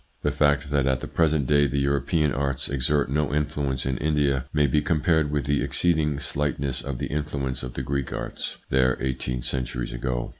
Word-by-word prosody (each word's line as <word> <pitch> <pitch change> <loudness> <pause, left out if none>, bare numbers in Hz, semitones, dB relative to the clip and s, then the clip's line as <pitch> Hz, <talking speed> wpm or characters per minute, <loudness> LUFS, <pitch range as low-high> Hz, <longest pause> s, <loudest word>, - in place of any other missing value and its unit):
The - - +2
fact 75 0 +2
that 70 -2 +2
at 65 -1 +2
the - - -5
present 80 -4 +2
day 70 +2 +4
the 70 +1 -2
European 70 +2 +1
arts 70 -1 -1
exert 70 0 +1
no 75 +1 +1
influence 75 -3 -1
in 65 -1 -1
India 70 -4 +1
may 75 -1 +3
be 75 +2 +2
compared 80 0 +2
with 75 -1 -1
the 70 0 +1
exceeding 80 -5 +1
slightness 70 -3 -1
of 70 -1 -4
the - - -2
influence 70 -3 -2
of 65 -1 -7
the 65 - -3
Greek 70 0 -2
arts - - -5
there 65 -1 +3
eighteen 65 -2 -2
centuries 60 -1 -3
ago. - - -2
70 Hz, 190 wpm, -25 LUFS, 65-75 Hz, -, day